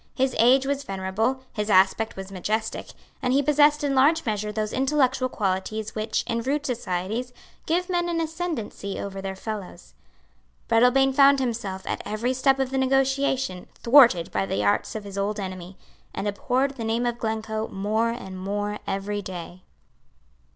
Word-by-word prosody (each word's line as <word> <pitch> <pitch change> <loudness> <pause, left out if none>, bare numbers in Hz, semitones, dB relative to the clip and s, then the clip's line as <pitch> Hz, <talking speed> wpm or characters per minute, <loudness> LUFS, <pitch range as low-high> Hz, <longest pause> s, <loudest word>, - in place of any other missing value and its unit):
His 265 0 +1
age 260 +3 +5
was 280 0 -1
venerable; 215 +5 -2
his 210 -1 -3
aspect 195 +3 +3
was 195 0 -8
majestic; 215 +4 -2 0.3
and 250 -1 +1
he 280 +1 +3
possessed 295 +1 +4
in 285 -1 +1
large 300 +5 +4
measure 210 -1 -2
those 215 0 -3
intellectual 265 -1 +1
qualities 210 +1 -2
which, 215 0 -1
in 230 -1 -1
rude 285 +4 -1
societies, 225 0 -3 0.4
give 355 +2 +1
men 350 -2 0
an 335 -1 -1
ascendency 320 - -4
over 195 -1 -5
their 190 0 -4
fellows. 195 -4 -7 0.7
Breadalbane 250 +4 +4
found 280 0 +6
himself, 220 -7 -3
at - - -3
every 230 +4 -1
step 270 +1 +3
of 265 -1 -1
the 270 - 0
negotiation, 265 -6 +1
thwarted 235 -9 +5
by 100 -1 -1
the 100 +1 -1
arts 100 - +1
of 215 - -4
his 200 -1 -6
old 205 +2 -1
enemy, 185 -1 -6 0.4
and 210 - -2
abhorred 260 +7 0
the 230 - -4
name 225 +2 0
of 240 0 -2
Glencoe 220 0 -2
more 215 +4 0
and 190 -6 -6
more 205 +2 -3
every 205 +1 -2
day. 180 -1 -8
225 Hz, 165 wpm, -25 LUFS, 200-270 Hz, 0.7 s, found